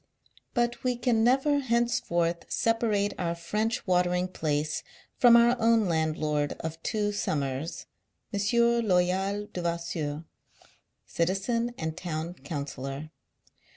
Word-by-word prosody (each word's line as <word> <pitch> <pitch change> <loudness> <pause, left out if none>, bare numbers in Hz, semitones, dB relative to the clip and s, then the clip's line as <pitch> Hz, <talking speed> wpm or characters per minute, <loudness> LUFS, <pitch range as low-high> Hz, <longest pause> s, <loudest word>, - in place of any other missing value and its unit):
But 240 -1 0
we 250 -1 +1
can 235 -2 +1
never 270 +4 +3
henceforth 235 -9 0
separate 220 -3 +1
our 170 -1 -1
French 210 +7 -2
watering 180 0 +2
place 150 -3 -1 0.4
from 240 -1 +8
our 235 +1 +5
own 225 -1 +4
landlord 155 -3 0
of 160 0 -6
two 210 -1 -1
summers, 145 -5 -2 0.5
M. 200 - 0 0.5
Loyal 190 +3 +1
Devasseur, 170 -3 -3 0.8
citizen 230 +8 -1
and 160 -1 -3
town 170 -1 -4
councillor. 140 -1 -6
180 Hz, 105 wpm, -28 LUFS, 160-225 Hz, 0.8 s, from